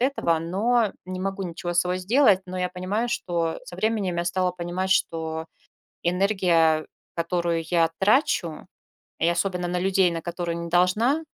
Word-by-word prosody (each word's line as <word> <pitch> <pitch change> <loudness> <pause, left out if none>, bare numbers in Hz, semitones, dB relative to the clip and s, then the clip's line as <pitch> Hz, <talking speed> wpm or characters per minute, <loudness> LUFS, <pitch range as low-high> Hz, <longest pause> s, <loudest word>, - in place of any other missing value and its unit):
этого, 245 - +1
но 205 +7 +1
не 185 0 -5
могу 195 +1 -3
ничего 175 -1 -4
с 175 - +5
собой 180 +1 -1
сделать. 205 +1 +4
Но 185 - -6
я 180 0 0
понимаю, 190 +6 -2
что 170 -7 -1
со 175 - -9
временем 200 -3 0
я 170 - -1
стала 180 +1 +1
понимать, 180 +2 -3
что 160 -3 0 0.6
энергия, 175 -4 +2 0.3
которую 170 -1 -1
я 165 -2 +3
трачу, 195 - +1 0.5
и 165 - +2
особенно 180 0 -1
на 180 0 -1
людей, 190 -1 +3
на 165 -1 -4
которые 175 0 -3
не 170 0 -5
должна, 210 - +2
180 Hz, 160 wpm, -25 LUFS, 170-195 Hz, 0.6 s, с